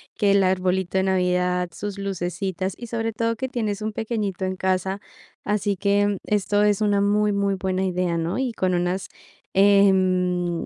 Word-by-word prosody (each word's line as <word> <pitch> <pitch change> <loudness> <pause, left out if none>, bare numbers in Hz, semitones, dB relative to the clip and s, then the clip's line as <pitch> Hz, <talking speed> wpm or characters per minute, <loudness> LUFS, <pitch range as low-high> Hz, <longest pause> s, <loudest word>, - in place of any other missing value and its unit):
que 205 -3 +2
el 200 -1 +4
arbolito 185 0 0
de 190 - +2
navidad, 180 -1 +1
sus 200 +2 -6
lucecitas 190 0 -3
y 235 - -9
sobre 225 -1 -2
todo 230 +1 -1
que 260 +3 -3
tienes 215 -5 -2
un 215 - -2
pequeñito 210 -5 -3
en 185 0 -2
casa. 190 +1 -1 0.4
Así 205 -1 0
que, 200 +1 +2
mm, 205 -2 -1
esto 205 0 +1
es 210 0 +2
una 205 -1 +2
muy, 210 +1 +2
muy 200 -1 0
buena 185 0 -1
idea, 180 -2 -1
¿no?, 165 +5 -2
y 255 -3 -1
con 185 -3 0
unas, 180 +1 -1 0.5
em, 185 -3 +3
195 Hz, 175 wpm, -23 LUFS, 185-205 Hz, 0.5 s, el